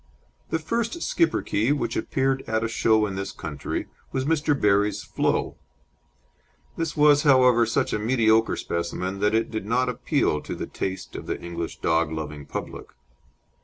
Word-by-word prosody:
The -, -, +1 dB
first 230 Hz, -, -2 dB
Schipperke 150 Hz, -, +1 dB
which 120 Hz, -5 st, -1 dB
appeared 135 Hz, +3 st, 0 dB
at 110 Hz, 0 st, 0 dB
a -, -, +1 dB
show 110 Hz, -1 st, +2 dB
in 100 Hz, -, -4 dB
this 95 Hz, 0 st, -4 dB
country 75 Hz, -3 st, -5 dB, 0.3 s
was 130 Hz, 0 st, -1 dB
Mr. 150 Hz, -2 st, +1 dB
Berrie's 105 Hz, 0 st, +2 dB
Flo. -, -, -1 dB, 1.2 s
This 165 Hz, -1 st, -3 dB
was, 145 Hz, -1 st, +6 dB
however, 125 Hz, -5 st, +5 dB
such 115 Hz, -, 0 dB
a -, -, 0 dB
mediocre 110 Hz, -1 st, +3 dB
specimen 90 Hz, +3 st, -3 dB
that 105 Hz, +2 st, +2 dB
it 115 Hz, -, 0 dB
did 110 Hz, -3 st, -4 dB
not 125 Hz, +3 st, +1 dB
appeal 125 Hz, -, 0 dB
to -, -, -6 dB
the -, -, -4 dB
taste 95 Hz, -1 st, -5 dB
of -, -, -7 dB
the -, -, -3 dB
English 85 Hz, -1 st, -6 dB
dog 80 Hz, -1 st, +2 dB
loving 75 Hz, -2 st, -6 dB
public. -, -, -6 dB
115 Hz, 160 wpm, -25 LUFS, 95-135 Hz, 1.2 s, was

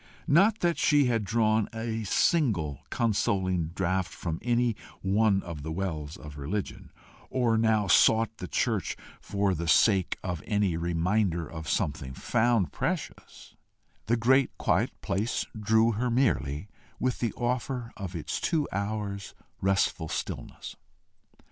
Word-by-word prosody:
Not 200 Hz, +9 st, +4 dB
that 170 Hz, -1 st, +1 dB
she 145 Hz, -2 st, +4 dB
had 115 Hz, -3 st, +1 dB
drawn 110 Hz, 0 st, +1 dB
a 115 Hz, 0 st, -3 dB
single 100 Hz, -, +1 dB
consoling 95 Hz, -6 st, 0 dB
draught 95 Hz, +1 st, -1 dB
from 80 Hz, -2 st, -4 dB
any 120 Hz, -1 st, +1 dB, 0.3 s
one 100 Hz, +1 st, +2 dB
of 85 Hz, -4 st, -7 dB
the 80 Hz, +2 st, -5 dB
wells 80 Hz, -4 st, -4 dB
of 75 Hz, -1 st, -10 dB
religion, 95 Hz, +9 st, -4 dB, 0.4 s
or 120 Hz, -3 st, +1 dB
now 110 Hz, -2 st, +3 dB
sought 110 Hz, +3 st, +4 dB
the 90 Hz, -, -6 dB
church -, -, -1 dB, 0.2 s
for 100 Hz, -1 st, 0 dB
the 85 Hz, 0 st, -3 dB
sake 95 Hz, +2 st, +4 dB
of 90 Hz, -3 st, -3 dB
any 105 Hz, -5 st, +1 dB
reminder 85 Hz, +1 st, 0 dB
of 80 Hz, 0 st, -7 dB
something 70 Hz, -3 st, -2 dB
found 115 Hz, -, +1 dB
precious: -, -, -4 dB, 0.5 s
the 120 Hz, +2 st, +2 dB
great 130 Hz, +3 st, +4 dB
quiet -, -, +1 dB
place 100 Hz, +5 st, -1 dB
drew 110 Hz, +2 st, +3 dB
her 120 Hz, +3 st, -1 dB
merely 105 Hz, -, 0 dB, 0.3 s
with 130 Hz, -1 st, -1 dB
the 115 Hz, -, 0 dB
offer 125 Hz, 0 st, -2 dB
of 95 Hz, -3 st, -6 dB
its 80 Hz, -, -3 dB
two 155 Hz, -4 st, +1 dB
hours' 100 Hz, 0 st, -3 dB, 0.3 s
restful 95 Hz, -4 st, +1 dB
stillness. -, -, -5 dB
105 Hz, 135 wpm, -28 LUFS, 85-115 Hz, 0.5 s, Not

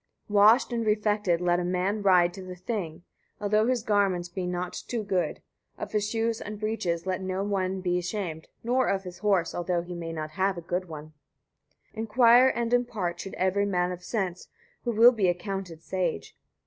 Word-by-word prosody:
61. 210 Hz, -, -7 dB
Washed 230 Hz, +4 st, +5 dB
and 230 Hz, -1 st, 0 dB
refected 210 Hz, -4 st, +1 dB
let 175 Hz, 0 st, +2 dB
a -, -, -1 dB
man 185 Hz, +4 st, -1 dB
ride 180 Hz, -3 st, +4 dB
to 190 Hz, -, -8 dB
the 185 Hz, -1 st, -8 dB
Thing, 180 Hz, -4 st, -5 dB, 0.4 s
although 210 Hz, +2 st, +2 dB
his 250 Hz, -3 st, 0 dB
garments 195 Hz, -5 st, +1 dB
be 180 Hz, 0 st, -4 dB
not 180 Hz, 0 st, -3 dB
too 235 Hz, -3 st, -2 dB
good; 190 Hz, -3 st, -1 dB, 0.3 s
of -, -, -6 dB
his 210 Hz, -1 st, 0 dB
shoes 225 Hz, 0 st, -1 dB
and 210 Hz, 0 st, -6 dB
breeches 190 Hz, -6 st, -2 dB
let 185 Hz, 0 st, -2 dB
no 190 Hz, +1 st, -2 dB
one 190 Hz, -2 st, -1 dB
be 180 Hz, -1 st, 0 dB
ashamed, 175 Hz, -3 st, -4 dB, 0.2 s
nor 250 Hz, +2 st, +2 dB
of 195 Hz, 0 st, 0 dB
his 180 Hz, -1 st, -9 dB
horse, 195 Hz, -5 st, +1 dB
although 175 Hz, 0 st, -1 dB
he 175 Hz, +1 st, -7 dB
have 165 Hz, 0 st, -5 dB
not 155 Hz, -1 st, -5 dB, 0.3 s
a -, -, -5 dB
good 180 Hz, +2 st, -2 dB
one. 155 Hz, 0 st, -9 dB, 0.8 s
62. -, -, -12 dB
Inquire 235 Hz, +3 st, +5 dB
and 235 Hz, -2 st, 0 dB
impart 210 Hz, -8 st, 0 dB
should 195 Hz, -, -6 dB
every 195 Hz, +2 st, +1 dB
man 180 Hz, -2 st, 0 dB
of 180 Hz, 0 st, -6 dB
sense, 185 Hz, -6 st, -3 dB, 0.4 s
who 240 Hz, -, +1 dB
will 230 Hz, +2 st, +7 dB
be 215 Hz, -6 st, +1 dB
accounted 180 Hz, -2 st, -3 dB
sage. 185 Hz, -3 st, -3 dB
190 Hz, 190 wpm, -27 LUFS, 175-215 Hz, 0.8 s, will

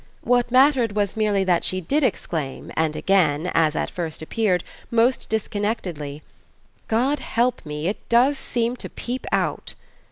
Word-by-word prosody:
What 245 Hz, -1 st, +2 dB
mattered 255 Hz, -3 st, +4 dB
was 205 Hz, -2 st, 0 dB
merely 210 Hz, -3 st, +2 dB
that 180 Hz, -2 st, +2 dB
she 185 Hz, -, 0 dB
did 285 Hz, -, 0 dB
exclaim, 155 Hz, -, -2 dB
and 160 Hz, -1 st, +1 dB
again, 175 Hz, -4 st, +2 dB
as 160 Hz, -2 st, +3 dB
at -, -, -2 dB
first 165 Hz, -4 st, -4 dB
appeared, 185 Hz, -1 st, 0 dB, 0.3 s
most 235 Hz, +2 st, +2 dB
disconnectedly: 200 Hz, -9 st, -3 dB, 0.6 s
"God 260 Hz, +6 st, +1 dB
help 245 Hz, -1 st, 0 dB
me, 150 Hz, +2 st, -3 dB
it 200 Hz, -, -4 dB
does 250 Hz, +5 st, +4 dB
seem 235 Hz, 0 st, -1 dB
to -, -, -7 dB
peep 250 Hz, +2 st, -5 dB
out!" -, -, -1 dB
205 Hz, 150 wpm, -23 LUFS, 165-240 Hz, 0.6 s, mattered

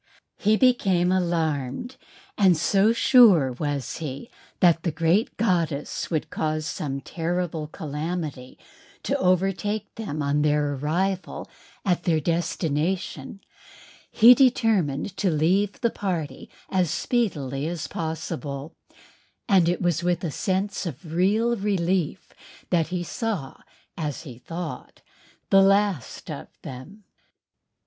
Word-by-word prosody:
He 215 Hz, +1 st, +3 dB
became 195 Hz, -9 st, +3 dB
alarmed 165 Hz, -, -1 dB, 0.4 s
and 185 Hz, -4 st, +4 dB
so 195 Hz, +6 st, +3 dB
sure 225 Hz, -, +6 dB
was 145 Hz, -1 st, -3 dB
he 155 Hz, -, -6 dB, 0.3 s
that 170 Hz, -3 st, +4 dB
the 170 Hz, -, -1 dB
great 165 Hz, +7 st, +1 dB
goddess 170 Hz, -9 st, -1 dB
would 155 Hz, -3 st, -2 dB
cause 155 Hz, 0 st, -2 dB
some 140 Hz, -2 st, -4 dB
terrible 165 Hz, -1 st, -3 dB
calamity 150 Hz, -3 st, -5 dB, 0.5 s
to -, -, 0 dB
overtake 195 Hz, +3 st, 0 dB
them 155 Hz, -10 st, -4 dB
on 145 Hz, +1 st, +1 dB
their 150 Hz, -1 st, +1 dB
arrival 175 Hz, +7 st, -2 dB, 0.4 s
at 180 Hz, -3 st, +1 dB
their 165 Hz, -3 st, +1 dB
destination 165 Hz, +1 st, -2 dB, 0.7 s
he 235 Hz, +2 st, +8 dB
determined 210 Hz, -, +2 dB
to 195 Hz, -, +1 dB
leave 180 Hz, +6 st, +1 dB
the 235 Hz, -, +2 dB
party 175 Hz, -7 st, -4 dB, 0.2 s
as 185 Hz, -3 st, +2 dB
speedily 155 Hz, -, -1 dB
as 170 Hz, -1 st, -4 dB
possible, 160 Hz, -2 st, -5 dB, 0.7 s
and 185 Hz, -4 st, +4 dB
it 175 Hz, +1 st, -1 dB
was 175 Hz, -1 st, +1 dB
with 175 Hz, 0 st, 0 dB
a 165 Hz, -, -2 dB
sense 190 Hz, +3 st, -1 dB
of 160 Hz, +1 st, -8 dB
real 215 Hz, +7 st, +2 dB
relief 190 Hz, -5 st, -1 dB, 0.4 s
that 165 Hz, -3 st, +2 dB
he 175 Hz, +1 st, -3 dB
saw, 195 Hz, -, -3 dB, 0.4 s
as 150 Hz, -2 st, -4 dB
he 125 Hz, -7 st, -10 dB
thought, 165 Hz, +4 st, -7 dB, 0.5 s
the 195 Hz, -1 st, +7 dB
last 195 Hz, -, +1 dB
of -, -, -7 dB, 0.2 s
them. 150 Hz, +12 st, -10 dB
175 Hz, 120 wpm, -25 LUFS, 150-195 Hz, 0.7 s, he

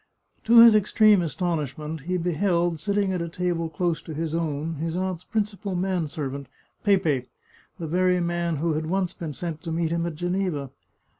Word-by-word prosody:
To 230 Hz, +1 st, +8 dB
his 230 Hz, -1 st, +9 dB
extreme 215 Hz, -1 st, +5 dB
astonishment 155 Hz, -3 st, -3 dB
he 180 Hz, -, +1 dB
beheld, 175 Hz, -1 st, 0 dB
sitting 200 Hz, +2 st, 0 dB
at 180 Hz, -, -2 dB
a 170 Hz, -, -3 dB
table 170 Hz, -1 st, -2 dB
close 170 Hz, +1 st, -1 dB
to 160 Hz, -, -8 dB
his 160 Hz, 0 st, -3 dB
own 160 Hz, -1 st, -2 dB
his 165 Hz, +2 st, -3 dB
aunt's 185 Hz, -1 st, -2 dB
principal 205 Hz, -3 st, -2 dB
man 180 Hz, -2 st, 0 dB
servant, 140 Hz, -3 st, -5 dB, 0.4 s
Pepe, 160 Hz, -11 st, +2 dB, 0.5 s
the 165 Hz, -, -5 dB
very 180 Hz, +2 st, +2 dB
man 170 Hz, -1 st, -1 dB
who 160 Hz, +2 st, 0 dB
had 155 Hz, +1 st, -2 dB
once 185 Hz, +1 st, 0 dB
been 160 Hz, -3 st, -6 dB
sent 165 Hz, 0 st, -5 dB
to 165 Hz, -, -5 dB
meet 165 Hz, 0 st, 0 dB
him 170 Hz, 0 st, 0 dB
at 165 Hz, -, -5 dB
Geneva. 175 Hz, -5 st, -2 dB
170 Hz, 175 wpm, -25 LUFS, 160-185 Hz, 0.5 s, his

